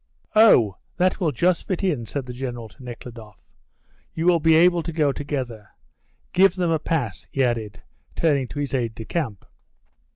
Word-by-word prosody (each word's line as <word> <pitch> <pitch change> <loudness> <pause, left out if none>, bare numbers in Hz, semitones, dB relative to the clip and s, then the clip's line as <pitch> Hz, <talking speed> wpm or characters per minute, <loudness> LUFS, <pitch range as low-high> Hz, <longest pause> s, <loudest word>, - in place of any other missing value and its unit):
"Oh, 120 - +6 0.2
that 185 +2 +2
will 170 -6 +1
just 175 +6 +1
fit 185 0 -2
in," 145 - -1
said 140 +2 -4
the 125 - -7
General 120 -2 -5
to 105 +5 -17
Nekhludoff. 115 -4 -10 0.7
"You 165 - -2
will 175 -1 +5
be 160 0 +4
able 175 +1 +5
to 165 - -5
go 150 -3 +2
together. 130 -8 -5 0.6
Give 190 0 +5
them 175 -3 0
a 160 - +2
pass," 160 -1 -3
he 135 - +1
added, 115 -4 -2 0.3
turning 145 -6 +1
to - - -10
his 145 -1 -3
aide 115 -4 -1
de 110 - -8
camp. 120 - -3
140 Hz, 175 wpm, -23 LUFS, 120-170 Hz, 0.7 s, Oh